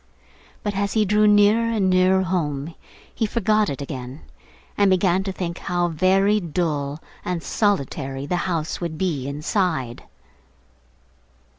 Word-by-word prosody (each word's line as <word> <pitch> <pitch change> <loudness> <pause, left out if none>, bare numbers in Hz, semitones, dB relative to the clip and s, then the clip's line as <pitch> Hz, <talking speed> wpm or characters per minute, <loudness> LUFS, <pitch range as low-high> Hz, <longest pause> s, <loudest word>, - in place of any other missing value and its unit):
But 205 -1 -2
as 200 0 -1
he 215 -1 +2
drew 210 +2 +3
nearer 210 +3 +4
and 215 -4 +1
nearer 185 +1 +3
home 160 -4 -2 0.4
he 220 - -1
forgot 215 -1 +1
it 140 0 -4
again, 130 0 -7 0.5
and 200 -1 +3
began 185 0 +3
to 195 - -2
think 175 -2 -4
how 175 -1 -1
very 195 +5 +3
dull 150 -4 -2 0.2
and 175 -2 -3
solitary 140 - -1
the 165 - -1
house 165 -1 -2
would 165 -2 -4
be 155 -7 -1
inside. 150 - -2
180 Hz, 135 wpm, -22 LUFS, 150-200 Hz, 0.5 s, nearer